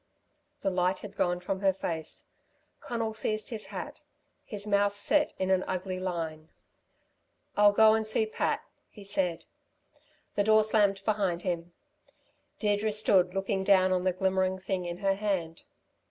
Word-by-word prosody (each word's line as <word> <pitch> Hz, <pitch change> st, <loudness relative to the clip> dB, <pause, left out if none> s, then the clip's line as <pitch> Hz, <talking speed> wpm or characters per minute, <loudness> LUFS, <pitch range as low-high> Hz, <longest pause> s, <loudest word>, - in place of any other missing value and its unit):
The 195 Hz, -, +1 dB
light 185 Hz, +1 st, +1 dB
had 200 Hz, -1 st, -10 dB
gone 175 Hz, -2 st, 0 dB
from 190 Hz, +1 st, -3 dB
her 195 Hz, -1 st, +3 dB
face. 165 Hz, -4 st, -5 dB, 0.5 s
Conal 230 Hz, -2 st, -3 dB
seized 215 Hz, -1 st, 0 dB
his 220 Hz, -2 st, -4 dB
hat. -, -, -7 dB, 0.4 s
His 205 Hz, -2 st, -5 dB
mouth 205 Hz, 0 st, +2 dB
set 295 Hz, +8 st, +2 dB
in 190 Hz, 0 st, 0 dB
an 185 Hz, -1 st, +3 dB
ugly 185 Hz, 0 st, -3 dB
line. 165 Hz, -4 st, -4 dB, 1.1 s
"I'll 205 Hz, 0 st, +6 dB
go 220 Hz, +1 st, +6 dB
and 220 Hz, 0 st, 0 dB
see 220 Hz, 0 st, +2 dB
Pat," 215 Hz, -, -1 dB, 0.3 s
he 210 Hz, -, -13 dB
said. 180 Hz, -4 st, -1 dB, 0.9 s
The 205 Hz, -, +1 dB
door 215 Hz, +1 st, +5 dB
slammed 205 Hz, -3 st, +2 dB
behind 195 Hz, -5 st, 0 dB
him. 175 Hz, -2 st, -3 dB, 0.8 s
Deirdre 210 Hz, 0 st, +1 dB
stood 190 Hz, -4 st, +3 dB
looking 195 Hz, 0 st, -1 dB
down 190 Hz, -1 st, +4 dB
on 180 Hz, -1 st, +1 dB
the 185 Hz, -, +2 dB
glimmering 190 Hz, 0 st, 0 dB
thing 185 Hz, -1 st, -3 dB
in 175 Hz, 0 st, -4 dB
her 195 Hz, 0 st, +1 dB
hand. 190 Hz, -5 st, -3 dB
195 Hz, 155 wpm, -29 LUFS, 180-210 Hz, 1.1 s, I'll